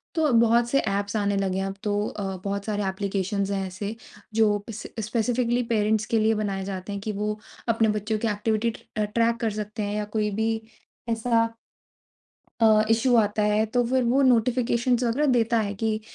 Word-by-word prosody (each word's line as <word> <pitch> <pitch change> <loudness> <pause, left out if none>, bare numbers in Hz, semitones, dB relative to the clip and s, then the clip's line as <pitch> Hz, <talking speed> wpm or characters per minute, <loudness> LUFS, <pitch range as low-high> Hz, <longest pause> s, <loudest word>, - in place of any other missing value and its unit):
तो 315 -3 +2
बहुत 235 +1 +4
से 275 - +3
एप्स 200 +1 -1
आने 200 -1 +1
लगे 190 -1 0
हैं 195 - -1
अब 195 - -5
तो 205 -1 0
अ, 205 - -5 0.2
बहुत 200 0 -3
सारे 210 -1 -1
एप्लीकेशंस 195 0 -2
हैं 195 -1 -1
ऐसे 200 +4 -5 0.4
जो 215 -2 +3
पस 220 -2 -7
अ, - - -1
स्पेसिफिकली 240 +2 0
पेरेंट्स 215 0 +2
के 225 - +4
लिए 220 +1 +3
बनाए 200 -2 -2
जाते 190 0 -5
हैं 200 - -5
कि 215 +1 -3
वो 210 +1 -3 0.3
अपने 225 -1 +2
बच्चों 210 +1 -1
की 230 - -1
एक्टिविटी 215 +2 0 0.3
अ, 215 - +2
ट्रैक 230 +2 +1
कर 225 - +1
सकते 210 0 -5
हैं 205 +1 -2
या 210 - -1
कोई 210 -1 +1
भी 225 0 +2 0.6
ऐसा 230 0 +2 1.2
अ, 215 -1 +6
इश्यू 235 +3 +3
आता 210 -1 +2
है 210 +1 +2
तो 245 +3 +1
फ़िर 260 +1 +2
वो 255 +4 +3
नोटिफिकेशंस 245 0 +2
वगैरह 250 +6 +1
देता 235 -1 +2
है, 205 -1 -2
कि 215 +1 -1
215 Hz, 195 wpm, -25 LUFS, 205-230 Hz, 1.2 s, अ